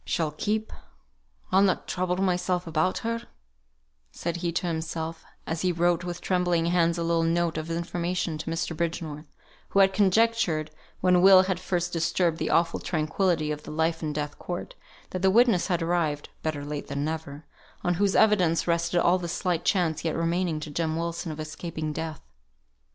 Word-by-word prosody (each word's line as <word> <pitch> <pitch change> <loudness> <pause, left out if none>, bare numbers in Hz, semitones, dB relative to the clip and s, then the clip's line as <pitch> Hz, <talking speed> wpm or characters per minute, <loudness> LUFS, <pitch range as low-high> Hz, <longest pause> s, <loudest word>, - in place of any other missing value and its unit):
"She'll 160 -3 -1
keep! 215 +7 -2 0.8
I'll 190 - +5
not 195 -2 +2
trouble 180 0 -1
myself 180 -1 0
about 165 +2 0
her," 230 0 -1 0.9
said 170 - -3
he 170 0 -2
to 180 - -1
himself, 160 -1 -3 0.2
as 165 0 -3
he 185 - +2
wrote 175 0 +1
with 175 -1 -5
trembling 175 -2 +1
hands 170 0 +2
a 170 - -1
little 165 0 +2
note 165 0 +1
of 155 +1 -4
information 170 0 -2
to 160 - -4
Mr. 165 0 -2
Bridgenorth, 160 -2 -3 0.4
who 200 - +2
had 195 0 +5
conjectured, 195 -6 +2 0.3
when 180 -1 +4
Will 190 0 +8
had 185 -1 -1
first 175 -1 -2
disturbed 165 0 +1
the - - -1
awful 170 0 +2
tranquillity 160 0 0
of 150 0 -4
the - - -10
life 160 +1 0
and 150 -2 -3
death 145 -1 -4
court, 175 0 -5 0.4
that 185 - -3
the 190 - +4
witness 225 -3 +4
had 175 -3 0
arrived 165 -4 0
(better 150 -2 -3
late 145 0 -5
than 140 0 -2
never) 155 -2 -5 0.4
on 175 - +2
whose 200 -1 +2
evidence 185 -7 +4
rested 170 +1 +1
all 175 +2 +3
the 175 - -4
slight 175 0 -1
chance 165 -5 +1
yet 165 -2 -1
remaining 165 -1 0
to 150 - -6
Jem 160 +1 -1
Wilson 170 0 -3
of 155 - -7
escaping 155 0 -5
death. 160 -1 -5
170 Hz, 180 wpm, -27 LUFS, 160-180 Hz, 0.9 s, Will